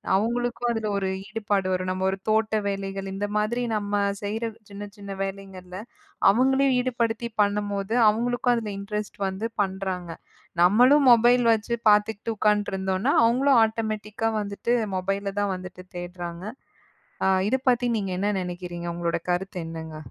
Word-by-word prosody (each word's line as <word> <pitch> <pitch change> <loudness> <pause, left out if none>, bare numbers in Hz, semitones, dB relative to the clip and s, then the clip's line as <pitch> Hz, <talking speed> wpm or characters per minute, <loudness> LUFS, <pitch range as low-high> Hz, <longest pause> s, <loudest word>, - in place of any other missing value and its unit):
அவங்களுக்கும் 240 +3 0
அதுல 225 -2 -2
ஒரு 195 -1 -1 0.2
ஈடுபாடு 205 -3 -1
வரும். 185 0 -1
நம்ம 185 0 -3
ஒரு 190 - -2
தோட்ட 220 0 +2
வேலைகள் 195 -1 -3
இந்த 200 +1 -2
மாதிரி 215 +4 0
நம்ம 205 -1 0 0.2
செய்ற 215 +3 -3 0.2
சின்ன 200 0 -8
சின்ன 200 -1 -7
வேலைங்கள்ல, 190 -2 -7 0.5
அவங்களையும் 265 +4 +3
ஈடுபடுத்தி 235 -2 -1
பண்ணும்போது, 205 0 -1 0.2
அவங்களுக்கும் 245 +3 +1
அதுல 220 -3 -3
இன்ட்ரஸ்ட் 210 +1 -5
வந்து 190 +4 -3
பண்றாங்க. 190 -2 -3 0.5
நம்மளும் 250 +10 +6
மொபைல் 240 +1 +5
வச்சு 225 +1 0 0.2
பாத்துக்கிட்டு 210 +1 +2
உட்காண்ட்ருந்தோன்னா, 205 +2 +1
அவங்களும் 255 +3 +4
ஆட்டமேட்டிக்கா 220 0 -2
வந்துட்டு 205 +3 -2 0.2
மொபைல 195 +1 -2
தான் 200 -1 0
வந்துட்டு 185 0 -9
தேட்றாங்க. 175 0 -6 0.8
அ - - +4 0.2
இத 260 - +2
பத்தி 245 0 +1
நீங்க 195 -3 -3
என்ன 205 +1 +1
நெனைக்கிறீங்க? 175 -1 -5
உங்களோட 170 0 -1
கருத்து 180 +1 -2
என்னங்க? 160 -1 -7
205 Hz, 135 wpm, -25 LUFS, 190-225 Hz, 0.8 s, நம்மளும்